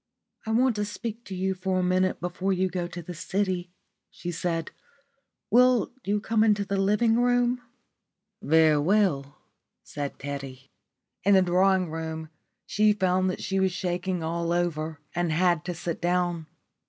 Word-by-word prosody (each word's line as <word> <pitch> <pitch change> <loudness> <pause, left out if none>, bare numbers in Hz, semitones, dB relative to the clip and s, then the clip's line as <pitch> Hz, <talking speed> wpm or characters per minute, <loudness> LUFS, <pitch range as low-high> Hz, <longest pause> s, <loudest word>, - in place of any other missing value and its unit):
"I - - -1
want 245 +1 +3
to 210 - 0
speak 225 +2 -6
to 190 - -6
you 190 +1 0
for 185 0 -2
a 185 - +1
minute 185 +1 +1
before 180 +2 -2
you 185 0 +1
go 175 -1 -3
to 175 0 -8
the 180 - -7
city," 185 +1 -2 0.4
she 175 - -6
said. 165 -1 -2 0.8
"Will 250 +1 +4
you 205 +2 0
come 220 +1 +1
into 210 -2 +2
the 200 - -4
drawing 210 +4 +3
room?" 245 0 +2 0.8
"Very 160 -3 +4
well," 155 -5 +1 0.5
said 145 -1 -5
Teddy. 135 -1 -7 0.5
In 200 +1 +5
the 190 - +6
drawing 185 -1 +2
room 160 -1 -5 0.4
she 210 0 +3
found 185 -2 +1
that 185 - -4
she 195 0 -1
was 190 -1 +1
shaking 180 -1 -2
all 170 +1 -2
over 160 -3 -1
and 175 -1 0
had 175 0 +2
to 175 -1 -3
sit 170 0 -4
down. 175 -2 0
180 Hz, 160 wpm, -26 LUFS, 170-200 Hz, 0.8 s, the